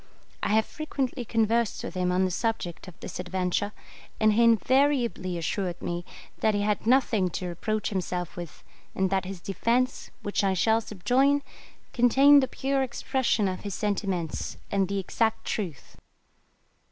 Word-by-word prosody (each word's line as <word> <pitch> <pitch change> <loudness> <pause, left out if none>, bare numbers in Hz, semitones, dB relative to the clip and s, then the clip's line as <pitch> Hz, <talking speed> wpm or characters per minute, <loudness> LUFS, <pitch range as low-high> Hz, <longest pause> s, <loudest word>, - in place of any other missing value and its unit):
I - - 0
have 220 - +3
frequently 275 -4 -3
conversed 225 0 +1
with - - -5
him 180 -1 0
on 185 +1 +2
the 185 - -1
subject 195 -4 -2
of 185 - -12
this - - -6
adventure, 180 +2 -1 0.5
and 215 -1 +4
he 235 +3 +4
invariably 235 -5 +2
assured 175 +1 -2
me 175 0 -4 0.3
that 215 -1 +2
he 205 - 0
had 210 +1 -1
nothing 230 -7 +3
to 180 - -4
reproach 215 +5 -2
himself 180 -2 -3
with, 175 -2 -8 0.3
and 190 -1 +1
that 190 -1 +1
his 190 -1 -6
defence, 235 +8 0
which 205 0 0
I 190 -1 +2
shall 220 +5 +3
subjoin, 260 +8 +2 0.5
contained 270 +4 +6
the 260 - 0
pure 270 +1 -1
expression 245 -3 0
of 185 -1 -3
his 200 -3 -5
sentiments, 195 -5 -2
and 195 -1 +2
the 200 +1 -2
exact 220 +4 0
truth. 175 - -4
210 Hz, 155 wpm, -27 LUFS, 185-240 Hz, 0.5 s, contained